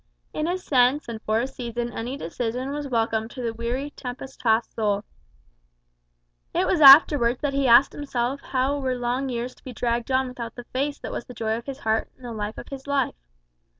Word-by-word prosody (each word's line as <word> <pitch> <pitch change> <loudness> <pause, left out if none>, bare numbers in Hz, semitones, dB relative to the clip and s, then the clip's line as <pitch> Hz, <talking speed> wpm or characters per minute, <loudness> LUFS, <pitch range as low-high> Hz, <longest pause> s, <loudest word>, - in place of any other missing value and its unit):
In 305 - -1
a 355 +2 0
sense 270 -4 +2
and 225 -2 -6
for 220 +1 +1
a - - 0
season 240 -2 -5
any 245 +4 -4
decision 245 +7 -3
was 290 0 -4
welcome 225 -3 0
to 255 - -8
the 230 -1 -2
weary, 245 +5 -3
tempest 260 +1 -8
tossed 225 -1 +1
soul. 205 -2 0 1.5
It - - +2
was 345 - +1
afterwards 270 -3 +8
that 290 -2 -1
he 275 -1 +1
asked 240 +3 +6
himself 270 -1 -2
how 270 +2 0
were 260 -2 -1
long 245 +2 -1
years 245 +1 -3
to - - -25
be 255 - -8
dragged 235 +1 -1
on 260 0 +2
without 240 -2 -7
the 245 - -8
face 280 +3 -1
that - - -5
was - - -5
the 250 - -11
joy 220 0 -1
of 235 +3 -7
his 275 -1 -5
heart 220 -4 0
and 255 - -14
the 235 - -5
life 210 0 -4
of - - -9
his 275 0 -8
life? 280 -1 +1
250 Hz, 210 wpm, -24 LUFS, 235-275 Hz, 1.5 s, afterwards